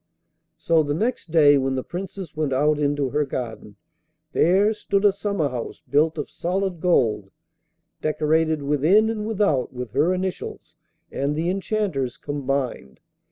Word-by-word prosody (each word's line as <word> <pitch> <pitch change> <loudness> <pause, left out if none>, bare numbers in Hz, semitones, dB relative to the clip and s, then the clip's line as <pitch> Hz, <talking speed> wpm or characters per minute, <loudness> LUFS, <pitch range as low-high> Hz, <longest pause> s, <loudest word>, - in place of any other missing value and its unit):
So 165 -1 +3
the 145 -1 -1
next 225 0 -2
day, 145 -3 +6
when 135 0 -1
the 130 - -2
Princess 185 -2 -7
went 150 -3 -1
out 150 +3 +2
into 145 -2 0
her 150 +1 +1
garden, 115 -6 -6 0.6
there 195 +6 +4
stood 200 -1 -1
a 200 - +5
summer 200 -7 -1
house 125 -3 -6
built 155 +3 +2
of 150 - -3
solid 185 0 -2
gold, 115 - +1 0.7
decorated 155 0 +1
within 160 +11 +3
and 215 -1 -4
without 200 - +1
with 125 -3 -6
her 145 +9 +2
initials 185 0 -4 0.4
and 140 +2 -1
the 165 +3 0
Enchanter's 190 - -2
combined. 135 - -3
155 Hz, 145 wpm, -23 LUFS, 140-185 Hz, 0.7 s, day